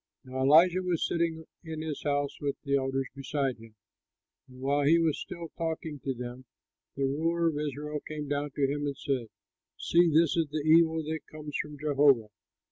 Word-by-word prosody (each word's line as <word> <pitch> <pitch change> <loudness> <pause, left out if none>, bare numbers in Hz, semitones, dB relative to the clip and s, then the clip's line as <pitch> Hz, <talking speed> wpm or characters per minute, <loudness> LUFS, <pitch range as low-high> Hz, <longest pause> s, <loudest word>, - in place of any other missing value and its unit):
Now 130 0 -5
Elisha 165 +7 +6
was 180 -3 0
sitting 165 -1 -1 0.2
in 160 -2 -5
his 155 -2 -4
house 145 -1 -1
with 140 -1 -1
the 140 -2 +1
elders 135 0 0
beside 135 -1 -2
him; 115 -1 -15 0.7
and 130 -1 -15
while 140 +2 +1
he 155 +4 +5
was 165 -3 +1
still 170 -2 -7
talking 160 -3 -4
with 135 -3 -2
them, 125 +1 -7 0.5
the 140 - -2
ruler 165 +5 +1
of 150 -2 -3
Israel 150 0 -3
came 150 -1 -5
down 145 +1 -1
to 140 - +2
him 145 +1 -2
and 140 -1 -4
said, 135 -6 -2 0.5
"See, 170 0 +3
this 160 0 +4
is 165 -2 +1
the 150 0 -3
evil 160 0 +5
that 160 +1 -3
comes 150 -1 -8
from 150 -1 -9
Jehovah! 140 -6 +3
150 Hz, 185 wpm, -29 LUFS, 140-160 Hz, 0.7 s, Elisha